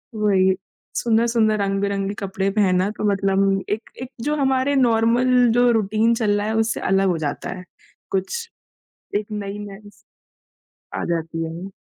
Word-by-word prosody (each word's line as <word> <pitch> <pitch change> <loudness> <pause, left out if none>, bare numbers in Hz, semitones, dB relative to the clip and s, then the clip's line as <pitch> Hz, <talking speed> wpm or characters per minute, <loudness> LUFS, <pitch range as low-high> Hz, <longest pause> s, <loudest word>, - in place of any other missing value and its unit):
वही। 190 -3 +3 0.4
सुंदर-सुंदर 230 -1 +2
रंग-बिरंगे 195 0 -1
कपड़े 195 0 -2
पहनना 190 -2 +2
तो - - -4
मतलब 195 0 +1
एक 215 +2 -3
एक 255 - -6 0.2
जो 300 - +1
हमारे 270 0 +1
नॉर्मल 235 -1 +3 0.3
जो 245 +1 +4
रूटीन 220 +1 +2
चल 220 -3 +1
रहा 205 +1 -1
है 220 - -1
उससे 225 0 +1
अलग 195 0 +3
हो 175 - +1
जाता 145 - -5
है। 180 - -9 0.5
कुछ 460 - -2 0.7
एक 210 +1 0
नई-नई 205 0 -6
स - - -20 1.0
आजाती 165 -1 -2
है। 170 +4 -6
205 Hz, 140 wpm, -22 LUFS, 195-230 Hz, 1.0 s, जो